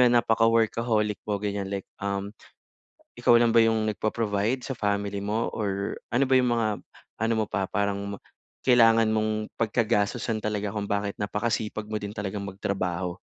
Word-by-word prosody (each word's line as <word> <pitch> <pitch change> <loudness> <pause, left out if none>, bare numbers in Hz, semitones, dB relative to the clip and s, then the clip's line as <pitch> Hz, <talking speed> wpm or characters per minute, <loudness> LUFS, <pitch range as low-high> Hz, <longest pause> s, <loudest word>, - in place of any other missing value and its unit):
yun, 120 -1 +5
napaka-workaholic 115 -2 +2
mo, 105 - +1
ganiyan, 100 -1 -3
like, 100 -1 -4 0.2
um, 100 0 -3 0.8
ikaw - - +3
lang 120 - +4
ba 115 - +4
yung 110 -1 +2
nagpo-provide 110 +2 0
sa 135 +1 -5
family 100 -1 -1
mo 110 +3 0
or 100 -2 -2 0.2
ano 130 +2 +2
ba 130 - +5
yung 125 -2 +3
mga 115 -2 +1 0.5
ano 115 +1 +1
mo 110 -1 0
pa 95 - -1
parang 100 +1 -2
ma - - -17 0.4
kailangan 115 -3 +5
mong 110 0 0
pagkagastosan 110 0 0
talaga 105 -1 -1
kung 105 0 -3
bakit 100 0 -2
napakasipag 105 +1 -2
mo 110 - -2
din 105 -1 -4
talagang 100 -1 -4
magtrabaho? 95 -2 -3
105 Hz, 160 wpm, -26 LUFS, 100-115 Hz, 0.8 s, yun